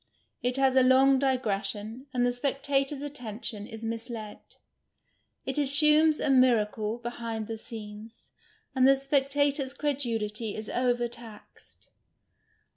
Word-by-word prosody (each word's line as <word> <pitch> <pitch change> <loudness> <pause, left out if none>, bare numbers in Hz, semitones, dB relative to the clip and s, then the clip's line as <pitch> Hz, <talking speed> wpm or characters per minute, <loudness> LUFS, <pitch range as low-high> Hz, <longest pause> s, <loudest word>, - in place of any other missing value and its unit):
It 250 +1 -1
has 265 -1 +3
a 260 - +6
long 260 +1 +5
digression, 220 -2 -2
and 245 -2 +1
the 245 - +1
speetator's 275 +2 -1
attention 230 -6 -6
is 225 0 -8
misled; 225 -1 -5 1.1
it - - -2
assumes 300 +2 +4
a 280 - +1
miracle 225 -4 +2
behind 230 -2 -5
the 225 0 -6
scenes, 220 -1 -10 0.4
and 260 -1 +4
the 275 0 +6
spectator's 275 0 +1
credulity 230 -7 -2
is 215 0 -6
over 245 -1 +1
taxed. 230 -3 -12
245 Hz, 120 wpm, -28 LUFS, 225-275 Hz, 1.1 s, a